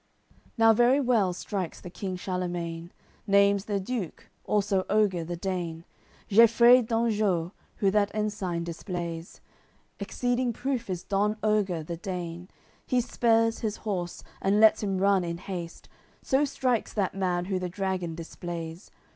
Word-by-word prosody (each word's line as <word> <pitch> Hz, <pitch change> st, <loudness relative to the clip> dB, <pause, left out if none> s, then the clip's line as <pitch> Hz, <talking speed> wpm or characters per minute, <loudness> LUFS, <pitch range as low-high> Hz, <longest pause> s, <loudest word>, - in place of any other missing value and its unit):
AOI. -, -, -37 dB
CCLVII -, -, -30 dB
Now 225 Hz, 0 st, +6 dB
very 245 Hz, +5 st, +4 dB
well 235 Hz, -8 st, +2 dB
strikes 185 Hz, 0 st, -4 dB
the 180 Hz, -, -10 dB
King 190 Hz, 0 st, -4 dB
Charlemagne, 175 Hz, -2 st, -4 dB, 0.4 s
Naimes 200 Hz, 0 st, +4 dB
the 205 Hz, -2 st, -1 dB
Duke, 195 Hz, -3 st, -5 dB
also 200 Hz, -2 st, +1 dB
Oger 200 Hz, -5 st, +2 dB
the 175 Hz, +2 st, -4 dB
Dane, 170 Hz, -2 st, -4 dB, 0.4 s
Geifreid 235 Hz, +3 st, +6 dB
d'Anjou, 215 Hz, -7 st, +1 dB, 0.2 s
who 195 Hz, -2 st, +2 dB
that 205 Hz, 0 st, +2 dB
ensign 205 Hz, -5 st, -2 dB
displays. 170 Hz, -1 st, -6 dB, 0.6 s
Exceeding 245 Hz, 0 st, -1 dB
proof 255 Hz, -3 st, -3 dB
is 180 Hz, -1 st, -3 dB
Don 205 Hz, +2 st, 0 dB
Oger, 200 Hz, -6 st, +1 dB
the 170 Hz, +2 st, -5 dB
Dane; 175 Hz, 0 st, -5 dB, 0.4 s
He 250 Hz, -, +2 dB
spurs 230 Hz, -2 st, +2 dB
his 215 Hz, -3 st, -2 dB
horse, 180 Hz, -5 st, -3 dB, 0.2 s
and 200 Hz, +2 st, +2 dB
lets 220 Hz, 0 st, +6 dB
him 195 Hz, -3 st, -1 dB
run 195 Hz, -1 st, +3 dB
in 170 Hz, -1 st, -3 dB
haste, 175 Hz, -2 st, -7 dB, 0.4 s
So 270 Hz, +2 st, +2 dB
strikes 255 Hz, -4 st, -1 dB
that 200 Hz, -4 st, 0 dB
man 180 Hz, -2 st, -1 dB
who 190 Hz, -1 st, -1 dB
the 180 Hz, -1 st, -3 dB
dragon 185 Hz, -3 st, -2 dB
displays. 165 Hz, +1 st, -7 dB
195 Hz, 145 wpm, -27 LUFS, 175-220 Hz, 0.6 s, Now